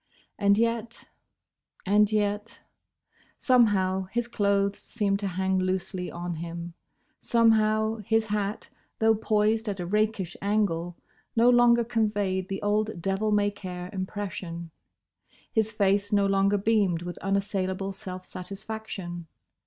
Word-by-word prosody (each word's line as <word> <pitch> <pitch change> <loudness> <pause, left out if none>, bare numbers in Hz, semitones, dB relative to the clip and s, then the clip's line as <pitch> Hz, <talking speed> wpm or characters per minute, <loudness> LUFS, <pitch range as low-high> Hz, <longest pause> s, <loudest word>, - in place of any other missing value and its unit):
And 200 -1 +4
yet—and 220 -2 -2
yet—! 210 +1 -1 0.8
Somehow, 195 -7 +3
his 240 +5 -2
clothes 200 -3 +1
seemed 200 -3 -1
to 200 - -2
hang 190 0 0
loosely 185 0 -2
on 175 0 -4
him. 170 +1 -6 0.5
Somehow, 220 -1 +3
his 220 +1 +1
hat, 210 -1 -3 0.3
though 225 0 +4
poised 215 +1 +1
at 200 -1 -4
a 175 - -3
rakish 210 -2 0
angle, 185 -5 0 0.4
no 235 +2 +5
longer 240 -1 +5
conveyed 205 -5 -1
the 195 +1 -4
old 210 -1 0
devil 195 +4 0
may 205 0 +2
care 180 -2 -7
impression. 185 -3 -5 0.8
His 220 -1 +1
face 200 -1 +1
no 200 -1 +3
longer 195 +1 +3
beamed 200 -5 +1
with 175 0 -6
unassailable 195 -1 -1
self 185 -1 -6
satisfaction. 190 -2 -6
200 Hz, 120 wpm, -27 LUFS, 185-215 Hz, 0.8 s, no